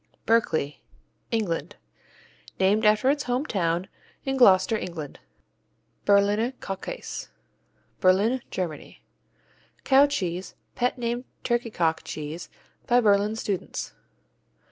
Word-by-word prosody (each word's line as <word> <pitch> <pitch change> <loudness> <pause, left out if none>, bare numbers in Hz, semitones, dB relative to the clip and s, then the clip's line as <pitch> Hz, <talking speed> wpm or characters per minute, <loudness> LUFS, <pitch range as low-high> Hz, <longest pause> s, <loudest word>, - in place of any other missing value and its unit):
Berkeley 160 -10 +1 0.5
England 210 -8 -2 0.8
Named 205 +3 +3
after 215 +5 +4
its 290 -1 -2
home 250 +3 0
town 175 - 0 0.4
in 270 0 0
Gloucester, 215 -4 +5
England. 170 -8 -6 0.9
Berliner 205 +4 +3
Kuhkäse 250 - -6 0.7
Berlin, 205 +7 +3
Germany 170 -5 -5 0.8
Cow 275 +1 +6
cheese, 185 -8 -3 0.2
pet 245 +1 0
named 240 +1 -2 0.2
turkey 240 -1 0
cock 165 -6 0
cheese 155 +3 -6 0.4
by 245 0 +5
Berlin 210 -1 +3
students. 205 -4 -4
210 Hz, 100 wpm, -26 LUFS, 180-245 Hz, 0.9 s, Cow